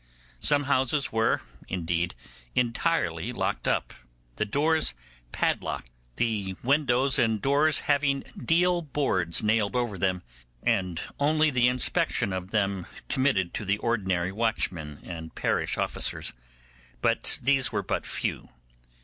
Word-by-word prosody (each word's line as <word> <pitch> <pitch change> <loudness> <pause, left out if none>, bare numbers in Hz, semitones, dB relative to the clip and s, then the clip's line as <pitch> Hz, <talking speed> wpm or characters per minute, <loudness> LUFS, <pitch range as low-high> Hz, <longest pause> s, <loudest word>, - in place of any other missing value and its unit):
Some 145 -1 +4
houses 135 0 +1
were, 110 0 +2 0.3
indeed, 85 -2 -1 0.4
entirely 115 - 0
locked 125 - -2
up, - - 0 0.4
the - - +1
doors 150 - +2 0.4
padlocked, - - -1 0.2
the 100 -5 -1
windows 135 -1 +3
and 110 -2 +2
doors 145 +5 +3
having 140 -1 +2 0.2
deal 175 +5 +3
boards 130 - 0
nailed 105 +1 +2
over 120 -6 -1
them, 95 -1 0 0.4
and 90 -3 +1 0.2
only 155 +2 +3
the 125 -2 +4
inspection 125 -5 +1
of 95 0 -4
them 100 -4 0 0.2
committed 120 -10 +1
to - - -3
the 100 +1 +1
ordinary 95 -6 0
watchmen 95 -9 -1
and 80 -2 -8
parish - - 0
officers; - - -1 0.7
but - - +1
these 135 0 +2
were 105 -3 -1
but - - -2
few. - - -3
115 Hz, 125 wpm, -27 LUFS, 95-140 Hz, 0.7 s, Some